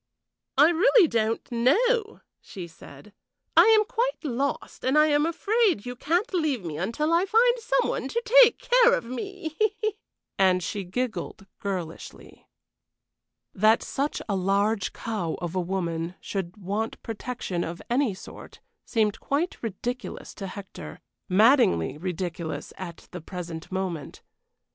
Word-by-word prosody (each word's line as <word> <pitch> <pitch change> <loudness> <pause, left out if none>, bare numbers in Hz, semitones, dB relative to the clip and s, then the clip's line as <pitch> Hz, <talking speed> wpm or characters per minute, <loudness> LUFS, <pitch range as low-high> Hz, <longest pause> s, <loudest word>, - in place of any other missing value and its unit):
"I 295 +4 +7
really 390 +3 +5
don't 225 -3 0
know," 430 - +2 0.2
she 185 -3 -8
said. 195 +5 -14 0.4
"I - - +8
am 440 -1 +5
quite - - -1
lost, 275 -1 -3
and 265 +3 +2
I 305 - +7
am 295 +1 +3
afraid 395 - +1
you 245 0 -5
can't 345 - 0
leave 300 - 0
me 155 -3 -4
until 235 - 0
I 350 +3 +3
find 475 +4 +4
some 470 +2 +1
one - - -2
to 470 - -1 0.2
take 475 -1 +6
care - - +4
of - - -4
me." 320 - -6 0.8
And 185 -2 +4
she 200 +2 -4
giggled 220 0 -4
girlishly. 180 -5 -6 1.1
That 215 +3 +4
such 280 +2 -2
a 200 - 0
large 200 +2 +1
cow 205 -8 -3
of 175 -1 -4
a 185 - 0
woman 170 -2 -3
should 190 -1 -5
want 210 +3 -3
protection 225 -6 -4
of 170 +1 -5
any 245 -4 +1
sort - - -12 0.2
seemed 215 -3 0
quite 300 +6 -2
ridiculous 240 +3 -5
to 195 - -6
Hector 185 - -9 0.3
maddeningly 185 - +4
ridiculous 175 -2 -4
at 175 -3 -9
the 180 - -7
present 170 -1 -7
moment. 185 -6 -4
225 Hz, 140 wpm, -26 LUFS, -, 1.1 s, I